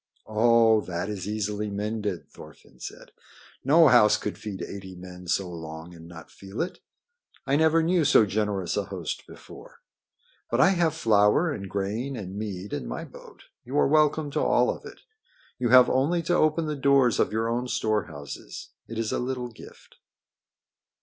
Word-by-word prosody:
"Oh, 115 0 +4
that 90 +2 -3
is 100 -3 -5
easily 105 0 -2
mended," 105 -5 -3
Thorfinn 65 - -16
said. - - -9 0.5
"No 155 +4 +6
house 105 -4 +6
could 105 - -4
feed 100 -5 -7
eighty 95 -1 -8
men 90 0 -11
so 95 +2 0
long 80 0 -8
and 85 -1 -13
not 85 -1 -12
feel 100 +2 -10
it. 180 - -7 0.7
I 135 - +1
never 160 +2 +3
knew 170 0 +2
so 140 -6 +5
generous 100 -3 -1
a 105 - -1
host 95 -5 -6
before. - - -14 0.7
But 120 - 0
I 140 - +6
have 170 -4 +1
flour 110 +5 +3
and 100 -9 -6
grain 105 +8 -3
and 95 -4 -7
mead 100 -2 -5
in - - -4
my - - -5
boat. - - -15 0.2
You 130 +4 -4
are - - +4
welcome 150 0 +2
to - - -1
all - - +3
of - - -15
it. - - -12 0.6
You 120 -1 0
have 125 0 +8
only 155 +7 +1
to 175 - 0
open 155 0 +2
the 150 -1 -2
doors 140 -3 +3
of - - +2
your 110 +1 -1
own 120 +2 -1
storehouses. 90 -12 -4 0.2
It 115 - -7
is 115 -1 -1
a - - -1
little 125 -1 -3
gift." 115 - -15
110 Hz, 175 wpm, -26 LUFS, 95-135 Hz, 0.7 s, have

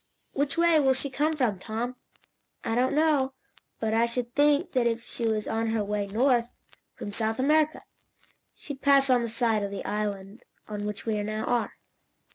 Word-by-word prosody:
"Which 280 +2 -1
way 335 -2 +5
will 265 -2 +3
she 275 +1 -3
come 300 +4 +1
from, 245 -10 0
Tom?" 230 +5 -4 0.7
"I - - -1
don't 250 +4 +2
know, 295 -4 +2 0.5
but 220 -1 -1
I 230 +1 +3
should 240 0 -4
think, 290 +4 +3
that 250 -3 +2
if 230 0 -1
she 235 - -3
was 215 -1 -1
on 225 +1 -1
her 220 -1 0
way 205 0 -2
north, 240 +3 +2 0.5
from 205 - -6
South 220 +1 -1
America, 305 +3 +2 0.7
she'd 285 -2 -9
pass 275 -1 +5
on 250 -1 +4
the 235 - -2
side 225 -2 +1
of 200 - -2
the 200 - -6
island 205 0 -3 0.3
on 210 -1 -4
which 210 -1 -5
we 215 -2 0
now 215 +1 -3
are." 240 -2 -1
235 Hz, 185 wpm, -27 LUFS, 215-275 Hz, 0.7 s, way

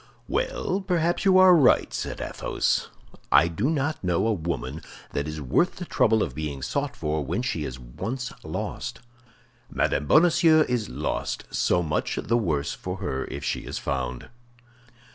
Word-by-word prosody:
"Well, - - -1
perhaps 175 0 0
you 190 -1 +6
are 185 -1 +8
right," 140 -7 +4
said - - -4
Athos. - - -1 0.4
"I 85 - +6
do 100 - -1
not 155 -3 -1
know 90 +2 +1
a 115 - +2
woman 80 - -4 0.3
that 70 +1 -2
is 75 0 -5
worth 75 - +1
the 180 - -6
trouble 110 -8 +3
of 65 - -4
being 70 -2 -4
sought - - -2
for 75 0 -2
when 115 - -2
she 80 -11 -2
is 65 -2 -5
once 110 - -5
lost. - - -5 0.7
Madame 75 - 0
Bonacieux 160 - +5
is 120 -4 -1
lost; - - -3
so 90 - +2
much 75 -2 -1
the 115 - 0
worse 80 -11 0
for - - -5
her 65 0 -3
if 70 +1 -7
she - - -1
is - - -6
found." 65 -2 -3
100 Hz, 160 wpm, -25 LUFS, -, 0.7 s, are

